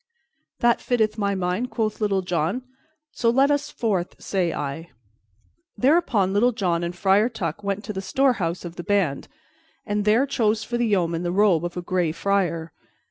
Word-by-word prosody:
"That 240 0 +3
fitteth 220 -3 0
my 200 -1 0
mind," 185 +6 -1
quoth 220 -3 -2
Little 195 -3 +1
John, 180 +7 -1 0.5
"so 235 - +1
let 270 +4 +4
us 290 +1 0
forth, 195 -7 -2
say 185 -4 -1
I." 150 +3 -5 0.9
Thereupon 250 - +2
Little 240 +5 +3
John 175 -5 0
and 170 +1 -3
Friar 195 +5 +3
Tuck 205 -5 -4
went 200 +1 -2
to 210 - -5
the 190 - -4
storehouse 190 -6 0
of 170 0 -8
the 175 - -5
band, 195 -9 0 0.6
and 205 0 -1
there 220 +6 +4
chose 220 -5 0
for 240 +2 -3
the 240 - +2
yeoman 170 -5 +1
the 175 0 -2
robe 190 -4 +3
of 175 +1 -4
a 180 - -3
Gray 175 -2 0
Friar. 170 -2 -1
200 Hz, 175 wpm, -24 LUFS, 175-225 Hz, 0.9 s, let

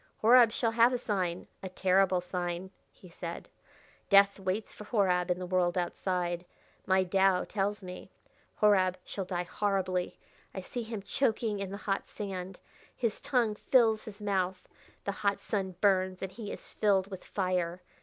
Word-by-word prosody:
"Horab 235 0 +7
shall 230 0 0
have 235 +2 +5
a - - +1
sign 185 -7 -2 0.2
a 190 - -5
terrible 185 0 +2
sign," 180 0 -4 0.2
he 185 - -16
said. 170 0 -7 0.6
"Death 200 0 +6
waits 195 +3 -2
for - - -10
Horab 185 -5 +1
in 180 - +1
the 180 - -5
world 180 -1 +1
outside, 175 -1 -1 0.4
my 190 0 +4
Tao 190 0 +3
tells 205 0 -2
me. 180 0 -8 0.5
Horab 190 -3 +4
shall 195 - -4
die 180 -1 -2
horribly. 185 -1 -1 0.4
I 190 - -3
see 240 +6 -5
him 220 -3 -6
choking 220 -3 0
in 195 -1 -3
the 200 - -5
hot 195 -1 -2
sand. 190 -2 -6 0.4
His 230 -4 -2
tongue 240 -5 +1
fills 225 0 +3
his 210 -1 -9
mouth. 190 -2 -1 0.4
The 200 - -1
hot 200 0 0
sun 190 -3 -3
burns, 190 -2 +2
and 190 - -4
he 215 -2 -7
is - - -8
filled 200 -2 +2
with 190 - -7
fire. 180 -2 -2
195 Hz, 165 wpm, -30 LUFS, 180-210 Hz, 0.6 s, Horab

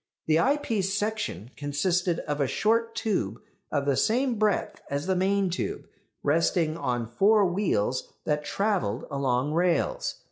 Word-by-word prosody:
The 160 0 +3
eyepiece 225 -7 +1
section 205 - -3
consisted 170 +4 0
of 145 0 -3
a 140 - +2
short 230 - +1
tube, 220 -3 -1 0.3
of 140 -2 0
the 140 -1 +2
same 240 - +1
breadth 215 -2 0
as 140 +2 -2
the 190 0 +1
main 195 0 +1
tube, 180 - -3 0.4
resting 160 +1 +2
on 125 -7 -1
four 200 - +4
wheels 175 - 0
that 150 0 0
travelled 185 - -1
along 135 +1 0
rails. 170 -1 +1
175 Hz, 140 wpm, -27 LUFS, 145-205 Hz, 0.4 s, four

